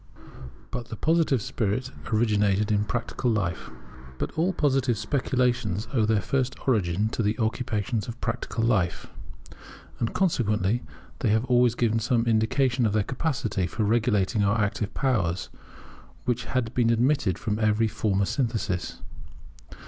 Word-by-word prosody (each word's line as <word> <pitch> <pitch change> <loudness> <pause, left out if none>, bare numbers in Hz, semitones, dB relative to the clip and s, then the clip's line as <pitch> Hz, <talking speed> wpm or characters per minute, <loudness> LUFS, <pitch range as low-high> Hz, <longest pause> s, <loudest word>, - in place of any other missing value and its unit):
[But 120 -1 -5
the - - -6
Positive 155 -3 +2
spirit 125 +1 -2 0.2
originated 105 -2 +2
in 105 0 +2
practical 120 +2 -2
life] 95 -6 -1 0.5
But - - -3
all 170 +4 +1
Positive 135 - +1
speculations 125 -5 0
owe 115 -5 +3
their 110 -3 +2
first 130 +2 0
origin 105 -4 +2
to 115 - -2
the 105 0 0
occupations 110 -1 -1
of 120 0 -7
practical 115 -1 -2
life; 95 -9 +1 0.9
and, 115 - -1
consequently, 115 - +1 0.4
they 115 - +1
have 110 +3 +2
always 120 -2 +3
given 115 -2 +1
some 120 0 +1
indication 120 +2 +2
of 105 - -1
their 105 -1 +2
capacity 115 - -1
for 110 +7 -2
regulating 105 -1 +2
our 100 +2 +2
active 105 0 -1
powers, 100 -10 0 0.8
which 125 0 -1
had 125 -3 -2
been 115 -2 +3
omitted 115 - +2
from 105 0 -2
every 110 0 +2
former 100 -2 0
synthesis. 110 -8 -2
115 Hz, 140 wpm, -26 LUFS, 105-125 Hz, 0.9 s, owe